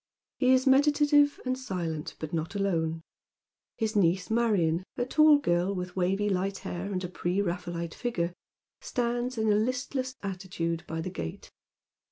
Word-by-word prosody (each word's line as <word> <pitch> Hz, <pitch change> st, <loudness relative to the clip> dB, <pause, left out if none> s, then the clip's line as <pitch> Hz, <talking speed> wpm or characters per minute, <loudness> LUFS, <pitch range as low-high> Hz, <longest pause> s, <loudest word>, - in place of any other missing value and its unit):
He 255 Hz, -, +3 dB
is 260 Hz, +1 st, +4 dB
meditative 290 Hz, +1 st, +4 dB
and 255 Hz, 0 st, 0 dB
silent, 175 Hz, -11 st, -4 dB
but 155 Hz, 0 st, -6 dB
not 165 Hz, +3 st, -2 dB
alone. 165 Hz, -5 st, 0 dB, 0.8 s
His 220 Hz, -1 st, -1 dB
niece 185 Hz, 0 st, +2 dB
Marion, 195 Hz, -8 st, +2 dB
a 245 Hz, -, 0 dB
tall 305 Hz, +3 st, +6 dB
girl 185 Hz, -7 st, +1 dB
with 180 Hz, -1 st, -5 dB
wavy 190 Hz, +3 st, +1 dB
light 195 Hz, 0 st, 0 dB
hair, 190 Hz, +1 st, -5 dB
and 185 Hz, -1 st, -2 dB
a -, -, -2 dB
pre 180 Hz, +1 st, -2 dB
Raphaelite 175 Hz, -3 st, -3 dB
figure, 180 Hz, -8 st, -2 dB, 0.5 s
stands 245 Hz, +1 st, -2 dB
in 220 Hz, -1 st, +2 dB
a -, -, +4 dB
listless 255 Hz, +3 st, -1 dB
attitude 180 Hz, -4 st, -3 dB
by 160 Hz, 0 st, -3 dB
the 185 Hz, -, -4 dB
gate. 80 Hz, -, -6 dB
195 Hz, 155 wpm, -29 LUFS, 175-245 Hz, 0.8 s, tall